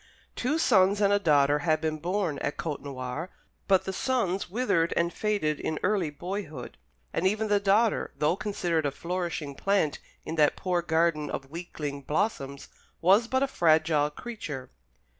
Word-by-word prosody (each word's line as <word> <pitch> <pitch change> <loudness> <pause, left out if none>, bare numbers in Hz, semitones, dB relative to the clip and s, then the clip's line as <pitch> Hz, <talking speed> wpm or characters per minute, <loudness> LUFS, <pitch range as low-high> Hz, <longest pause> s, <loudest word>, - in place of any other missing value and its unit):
Two 285 +6 0
sons 200 -9 +4
and 205 -1 +4
a 205 - +4
daughter 145 -5 +4
had 155 0 +1
been 155 -1 -2
born 175 -2 -1
at 145 - -3
Côtenoir; 140 0 -4 0.4
but 190 -2 +4
the 190 - -3
sons 195 -4 -1
withered 185 -6 +1
and 170 0 +1
faded 205 -9 0
in 155 - -2
early 190 -5 +1
boyhood, 155 -4 -6 0.4
and 180 - +2
even 215 +2 0
the 205 0 +4
daughter, 205 +3 +2
though 150 +3 +2
considered 175 -7 -1
a - - +1
flourishing 170 -1 -4
plant 195 -2 +1 0.3
in 160 - -4
that 150 -1 +4
poor 180 -2 0
garden 160 -3 +1
of 135 0 -5
weakling 150 -4 -5
blossoms, 140 -2 -2 0.3
was 195 +7 +4
but 260 +2 +1
a - - +2
fragile 155 - +3
creature. 150 - -7
170 Hz, 160 wpm, -28 LUFS, 150-200 Hz, 0.4 s, sons